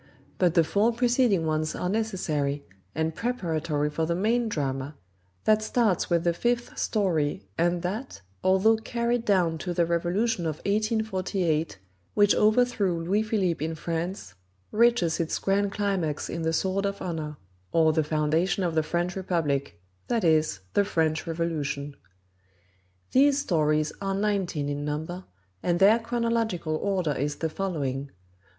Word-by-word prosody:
But 175 Hz, -3 st, +3 dB
the 165 Hz, -, +6 dB
four 200 Hz, +8 st, +2 dB
preceding 240 Hz, -6 st, +2 dB
ones 155 Hz, 0 st, -1 dB
are 180 Hz, -, -2 dB
necessary, 160 Hz, -9 st, -1 dB, 0.3 s
and 160 Hz, +1 st, 0 dB
preparatory 160 Hz, -10 st, -1 dB
for 160 Hz, +1 st, -1 dB
the 170 Hz, -, 0 dB
main 225 Hz, +5 st, +1 dB
drama, 140 Hz, -4 st, -3 dB, 0.5 s
that 215 Hz, 0 st, +4 dB
starts 215 Hz, -4 st, +1 dB
with 170 Hz, -1 st, +2 dB
the 170 Hz, -1 st, +2 dB
fifth 240 Hz, +6 st, -1 dB
story 165 Hz, -, 0 dB
and 175 Hz, +1 st, +1 dB
that, 205 Hz, -, -4 dB, 0.2 s
although 190 Hz, +4 st, +4 dB
carried 235 Hz, +1 st, -1 dB
down 175 Hz, -6 st, +2 dB
to 175 Hz, 0 st, -4 dB
the 170 Hz, -, +3 dB
revolution 175 Hz, +3 st, 0 dB
of 155 Hz, -, -2 dB
1848 195 Hz, -, 0 dB, 0.4 s
which 205 Hz, -1 st, +5 dB
overthrew 210 Hz, -6 st, +2 dB
Louis 195 Hz, +5 st, +1 dB
Philippe 195 Hz, -7 st, 0 dB
in 160 Hz, +1 st, -2 dB
France, 165 Hz, -, -4 dB, 0.4 s
reaches 220 Hz, -7 st, +3 dB
its 165 Hz, -1 st, -1 dB
grand 200 Hz, +1 st, +1 dB
climax 195 Hz, -8 st, -1 dB
in 170 Hz, -, -3 dB
The 160 Hz, 0 st, 0 dB
Sword 190 Hz, +4 st, 0 dB
of 200 Hz, 0 st, -4 dB
Honor; 155 Hz, -4 st, -4 dB, 0.3 s
or, 160 Hz, -1 st, +4 dB
The 160 Hz, 0 st, +2 dB
Foundation 155 Hz, +5 st, +1 dB
of 170 Hz, -2 st, 0 dB
the 160 Hz, -, +3 dB
French 175 Hz, +3 st, -2 dB
Republic, 145 Hz, -, -1 dB, 0.3 s
that 230 Hz, -2 st, 0 dB
is, 155 Hz, -, +2 dB
the 205 Hz, -, +4 dB
French 160 Hz, -5 st, 0 dB
Revolution. 155 Hz, -4 st, -2 dB, 1.2 s
These 280 Hz, +1 st, +5 dB
stories 155 Hz, -, +1 dB
are 195 Hz, -1 st, -1 dB
nineteen 195 Hz, -7 st, -1 dB
in 145 Hz, 0 st, -3 dB
number, 160 Hz, +5 st, -4 dB, 0.4 s
and 175 Hz, -1 st, +1 dB
their 205 Hz, +5 st, +6 dB
chronological 230 Hz, -8 st, -1 dB
order 185 Hz, -4 st, 0 dB
is 145 Hz, +2 st, -2 dB
the 160 Hz, -, -2 dB
following: 145 Hz, -8 st, -2 dB
1. 140 Hz, -, -18 dB
175 Hz, 145 wpm, -27 LUFS, 155-205 Hz, 1.2 s, the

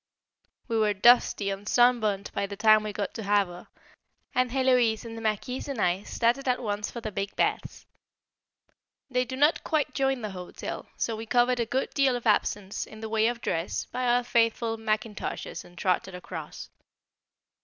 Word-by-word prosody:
We 230 Hz, -2 st, 0 dB
were 210 Hz, -1 st, +2 dB
dusty 210 Hz, -2 st, +4 dB
and 195 Hz, +1 st, -5 dB
sun 245 Hz, 0 st, +5 dB
burnt 205 Hz, -2 st, -2 dB
by 200 Hz, -, -1 dB
the 200 Hz, -, -7 dB
time 215 Hz, 0 st, +6 dB
we 215 Hz, 0 st, -4 dB
got 200 Hz, 0 st, -4 dB
to 225 Hz, -, -6 dB
Havre, 200 Hz, -3 st, 0 dB, 0.7 s
and 255 Hz, 0 st, +2 dB
Héloise 250 Hz, -4 st, +2 dB
and 225 Hz, 0 st, -7 dB
the 225 Hz, -, -7 dB
Marquise 225 Hz, +5 st, -2 dB
and 275 Hz, -5 st, -4 dB
I 180 Hz, 0 st, +1 dB
started 240 Hz, +5 st, 0 dB
at 250 Hz, 0 st, +2 dB
once 205 Hz, -3 st, -3 dB
for 235 Hz, -, -7 dB
the 215 Hz, -, -4 dB
big 195 Hz, +1 st, -4 dB
baths. -, -, -1 dB, 1.3 s
They 250 Hz, 0 st, +1 dB
do 260 Hz, -, -5 dB
not 295 Hz, +4 st, +3 dB
quite 310 Hz, -3 st, 0 dB
join 270 Hz, -3 st, 0 dB
the 210 Hz, -, -3 dB
hotel, 180 Hz, -1 st, -7 dB
so 230 Hz, -, -1 dB
we 225 Hz, +1 st, -7 dB
covered 245 Hz, +1 st, +3 dB
a 235 Hz, -, 0 dB
good 260 Hz, +3 st, -1 dB
deal 275 Hz, -3 st, +3 dB
of 245 Hz, -, -5 dB
absence, 205 Hz, -2 st, 0 dB
in 220 Hz, 0 st, -12 dB
the 220 Hz, -, -5 dB
way 220 Hz, 0 st, +2 dB
of 240 Hz, 0 st, -2 dB
dress, 165 Hz, +2 st, -2 dB
by 250 Hz, 0 st, -3 dB
our 245 Hz, +1 st, +3 dB
faithful 230 Hz, -1 st, +1 dB
mackintoshes 215 Hz, -1 st, -3 dB
and 175 Hz, -, -18 dB
trotted 185 Hz, 0 st, 0 dB
across. 165 Hz, -4 st, -8 dB
225 Hz, 185 wpm, -27 LUFS, 205-245 Hz, 1.3 s, time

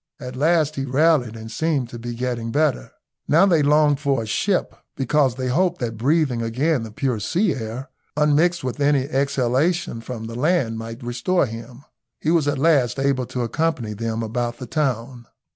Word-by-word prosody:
At 125 Hz, -2 st, -7 dB
last 155 Hz, +1 st, +2 dB
he 135 Hz, -, -1 dB
rallied, 135 Hz, -3 st, +2 dB
and 110 Hz, 0 st, -8 dB
seemed 150 Hz, -6 st, -1 dB
to 120 Hz, -, -8 dB
be 120 Hz, 0 st, -5 dB
getting 120 Hz, -2 st, -3 dB
better. 145 Hz, -, +1 dB, 0.4 s
Now 165 Hz, +6 st, +5 dB
they 170 Hz, -6 st, +4 dB
longed 145 Hz, 0 st, +4 dB
for 140 Hz, -5 st, 0 dB
a -, -, -6 dB
ship, 185 Hz, -, 0 dB, 0.2 s
because 135 Hz, -1 st, +1 dB
they 130 Hz, 0 st, -2 dB
hoped 175 Hz, +6 st, +1 dB
that 115 Hz, -3 st, -3 dB
breathing 135 Hz, +1 st, +1 dB
again 130 Hz, +6 st, 0 dB
the 115 Hz, -, -6 dB
pure 125 Hz, 0 st, -2 dB
sea 175 Hz, -, +1 dB
air, 125 Hz, +2 st, -6 dB, 0.3 s
unmixed 150 Hz, +3 st, +3 dB
with 130 Hz, +2 st, -4 dB
any 140 Hz, -2 st, +3 dB
exhalation 140 Hz, +2 st, 0 dB
from 115 Hz, -1 st, -6 dB
the 115 Hz, -, -7 dB
land, 125 Hz, -4 st, +1 dB
might 115 Hz, +2 st, -7 dB
restore 120 Hz, +9 st, +1 dB
him. 120 Hz, +3 st, -9 dB, 0.4 s
He 155 Hz, -, 0 dB
was 165 Hz, -4 st, +2 dB
at 145 Hz, -1 st, +1 dB
last 140 Hz, -5 st, +3 dB
able 135 Hz, -2 st, 0 dB
to 125 Hz, -, -3 dB
accompany 125 Hz, -4 st, -1 dB
them 115 Hz, +1 st, -3 dB
about 120 Hz, +1 st, -2 dB
the 125 Hz, -, -7 dB
town. 125 Hz, -5 st, -2 dB
130 Hz, 180 wpm, -22 LUFS, 120-150 Hz, 0.4 s, Now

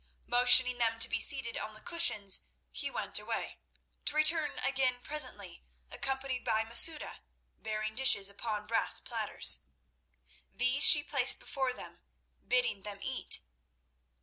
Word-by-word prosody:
Motioning 245 Hz, 0 st, +5 dB
them 225 Hz, -1 st, -1 dB
to 225 Hz, -, +6 dB
be 230 Hz, -, -4 dB
seated 260 Hz, -2 st, 0 dB
on 215 Hz, -, -8 dB
the -, -, -14 dB
cushions, 215 Hz, -, 0 dB, 0.3 s
he -, -, -3 dB
went -, -, -4 dB
away, -, -, -7 dB, 0.5 s
to -, -, 0 dB
return 310 Hz, 0 st, +3 dB
again 260 Hz, -2 st, -2 dB
presently, 300 Hz, +4 st, -3 dB, 0.3 s
accompanied 265 Hz, -1 st, -5 dB
by 220 Hz, -1 st, -1 dB
Masouda 295 Hz, +8 st, +2 dB, 0.4 s
bearing 215 Hz, 0 st, -6 dB
dishes 220 Hz, -6 st, +5 dB
upon 210 Hz, +1 st, -7 dB
brass 225 Hz, +2 st, -2 dB
platters. -, -, -1 dB, 0.9 s
These 255 Hz, +3 st, -2 dB
she 295 Hz, -2 st, +10 dB
placed 270 Hz, -3 st, +1 dB
before 265 Hz, -2 st, -4 dB
them, 250 Hz, -, -12 dB, 0.5 s
bidding 250 Hz, -5 st, -1 dB
them 205 Hz, 0 st, -9 dB
eat. -, -, -4 dB
250 Hz, 130 wpm, -30 LUFS, 220-270 Hz, 0.9 s, she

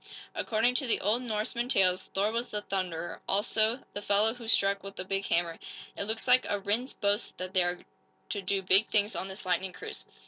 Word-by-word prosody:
According 230 Hz, +2 st, +1 dB
to 265 Hz, -, -3 dB
the 230 Hz, -, +3 dB
old 215 Hz, +5 st, +1 dB
Norsemen 235 Hz, +1 st, -2 dB
tales 185 Hz, -6 st, +3 dB
Thor 200 Hz, +2 st, 0 dB
was 235 Hz, +2 st, -2 dB
The 210 Hz, 0 st, -4 dB
Thunderer 180 Hz, -4 st, -3 dB
also 220 Hz, +4 st, +2 dB
the 205 Hz, -, -4 dB
fellow 205 Hz, +2 st, +3 dB
who 235 Hz, -2 st, -10 dB
struck 200 Hz, -2 st, +3 dB
with 195 Hz, 0 st, -9 dB
the 185 Hz, -, -5 dB
big 195 Hz, +1 st, -2 dB
hammer. 170 Hz, -1 st, 0 dB, 0.4 s
It -, -, -2 dB
looks 220 Hz, +3 st, -3 dB
like 255 Hz, 0 st, +6 dB
a 205 Hz, -, 0 dB
Rhinds 215 Hz, +6 st, -1 dB
boast 205 Hz, +2 st, -1 dB
that 185 Hz, 0 st, -5 dB
they 185 Hz, -, +4 dB
are 175 Hz, 0 st, -1 dB, 0.4 s
to 200 Hz, -, -2 dB
do 195 Hz, +1 st, 0 dB
big 190 Hz, +4 st, +5 dB
things 210 Hz, +1 st, +1 dB
on 190 Hz, -, -3 dB
this 190 Hz, 0 st, -9 dB
lightning 185 Hz, +1 st, 0 dB
cruise." 435 Hz, -, -8 dB
205 Hz, 210 wpm, -29 LUFS, 190-225 Hz, 0.4 s, like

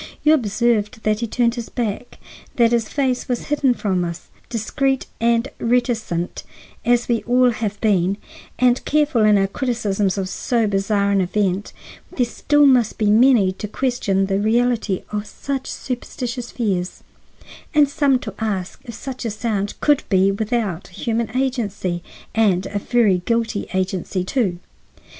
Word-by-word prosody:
You 310 Hz, -, +6 dB
observed 225 Hz, -3 st, +1 dB
that 215 Hz, 0 st, +1 dB
he 235 Hz, -, -2 dB
turned 235 Hz, +1 st, +1 dB
his 235 Hz, -2 st, -6 dB
back; 235 Hz, -1 st, -4 dB, 0.4 s
that 235 Hz, -1 st, +4 dB
his 230 Hz, -2 st, +1 dB
face 260 Hz, -3 st, -1 dB
was 245 Hz, +2 st, -2 dB
hidden 280 Hz, -4 st, +2 dB
from 185 Hz, -5 st, 0 dB
us. 170 Hz, -1 st, -6 dB, 0.2 s
Discreet 265 Hz, +4 st, -1 dB
and 235 Hz, +2 st, +2 dB
reticent 230 Hz, -8 st, -1 dB, 0.4 s
as 240 Hz, 0 st, +2 dB
we 235 Hz, -, +2 dB
have -, -, -16 dB
all 250 Hz, 0 st, +4 dB, 0.3 s
been, 195 Hz, -3 st, +2 dB, 0.4 s
and 250 Hz, 0 st, +3 dB
careful 295 Hz, -6 st, +2 dB
in 210 Hz, -1 st, +5 dB
our 195 Hz, -, +3 dB
criticisms 205 Hz, -3 st, -1 dB
of 190 Hz, -1 st, -1 dB
so 230 Hz, +4 st, 0 dB
bizarre 200 Hz, 0 st, +1 dB
an 200 Hz, -1 st, +3 dB
event, 195 Hz, +1 st, -1 dB, 0.5 s
there 250 Hz, -, +3 dB
still 290 Hz, +4 st, +2 dB
must 250 Hz, -5 st, +4 dB
be 210 Hz, -1 st, +2 dB
many 225 Hz, -4 st, +5 dB
to 195 Hz, +3 st, -6 dB
question 210 Hz, -5 st, 0 dB
the 195 Hz, 0 st, 0 dB
reality 225 Hz, -2 st, +1 dB
of 210 Hz, 0 st, -3 dB
such 275 Hz, +3 st, -4 dB
superstitious 245 Hz, -1 st, -5 dB
fears, 190 Hz, -6 st, -2 dB, 0.7 s
and 295 Hz, -1 st, +6 dB
some 280 Hz, -2 st, +2 dB
to 215 Hz, -, -6 dB
ask 200 Hz, -5 st, -3 dB
if 235 Hz, -, -8 dB
such 260 Hz, +2 st, -6 dB
a 230 Hz, -, -1 dB
sound 210 Hz, -2 st, -2 dB
could 295 Hz, -2 st, +3 dB
be 190 Hz, 0 st, +4 dB
without 205 Hz, -3 st, -2 dB
human 230 Hz, +5 st, -2 dB
agency, 205 Hz, -9 st, -1 dB, 0.3 s
and 195 Hz, -5 st, +2 dB
a 205 Hz, -, -3 dB
very 210 Hz, -4 st, +2 dB
guilty 230 Hz, -3 st, -1 dB
agency, 185 Hz, 0 st, -1 dB
too. 190 Hz, -4 st, 0 dB
225 Hz, 150 wpm, -21 LUFS, 200-245 Hz, 0.7 s, You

